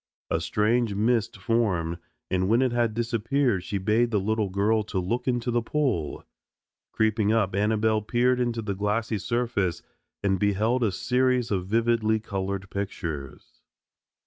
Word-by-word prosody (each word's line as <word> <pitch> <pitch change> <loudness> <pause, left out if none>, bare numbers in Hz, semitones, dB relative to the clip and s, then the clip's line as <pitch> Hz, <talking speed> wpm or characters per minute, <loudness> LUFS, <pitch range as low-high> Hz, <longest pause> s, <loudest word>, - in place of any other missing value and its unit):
A - - +1
strange 110 0 +1
mist 110 +1 +1
formed, 95 -8 0 0.3
and 95 0 +1
when 120 +4 +4
it 130 - +1
had 120 -2 0
disappeared 120 -2 0
she 100 - -3
bade 110 +5 +2
the 105 -3 +1
little 105 +1 0
girl 105 +4 +2
to 105 - -4
look 115 +8 -1
into 120 -1 0
the 120 0 +1
pool. 115 - -1 0.7
Creeping 110 -1 +1
up 110 -4 +1
Annabelle 110 +2 +2
peered 125 +4 +1
into 120 -2 -1
the 100 -1 -2
glassy 105 +2 -1
surface, 115 -5 -1 0.4
and 95 -2 +1
beheld 105 +5 +1
a 110 - +2
series 125 +3 +1
of 95 -2 -1
vividly 110 0 +2
colored 100 -2 -4
pictures. 85 -8 -6
110 Hz, 145 wpm, -26 LUFS, 100-120 Hz, 0.7 s, when